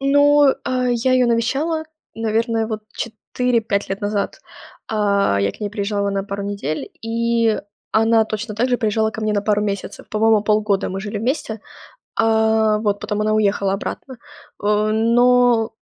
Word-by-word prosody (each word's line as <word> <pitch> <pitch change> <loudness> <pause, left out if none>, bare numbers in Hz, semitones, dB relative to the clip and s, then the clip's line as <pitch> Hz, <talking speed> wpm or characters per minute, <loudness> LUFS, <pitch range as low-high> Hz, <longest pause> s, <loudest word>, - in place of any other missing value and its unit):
Ну, 285 0 +5
а, 255 -1 0
я 245 +2 +1
ее 255 -1 +4
навещала, 275 +8 0 0.3
наверное, 225 0 0
вот 220 -1 -5
4-5 225 -2 -2
лет 195 +1 -4
назад. 205 -1 -2 0.5
А, 200 - +1
я 100 - +1
к - - -18
ней 205 -1 -3
приезжала 200 -1 -1
на 195 0 -1
пару 200 0 -5
недель, 200 -7 -4
и 230 -1 +1 0.3
она 225 0 +4
точно 215 0 -5
так 240 +5 0
же 245 - +2
приезжала 220 0 +1
ко 220 - -7
мне 215 0 0
на 205 -1 0
пару 210 0 +1
месяцев. 200 -2 -5
По-моему, 215 0 +3
полгода 210 -2 +1
мы 190 - -4
жили 210 +2 -5
вместе, 225 -2 -2 0.6
э, 220 -1 +3
вот, 205 -2 0
потом 210 - -3
она 215 0 +1
уехала 200 -2 +1
обратно. 255 +5 -6 0.4
О, 210 +1 +1
но 240 0 +3
220 Hz, 160 wpm, -20 LUFS, 205-235 Hz, 0.6 s, Ну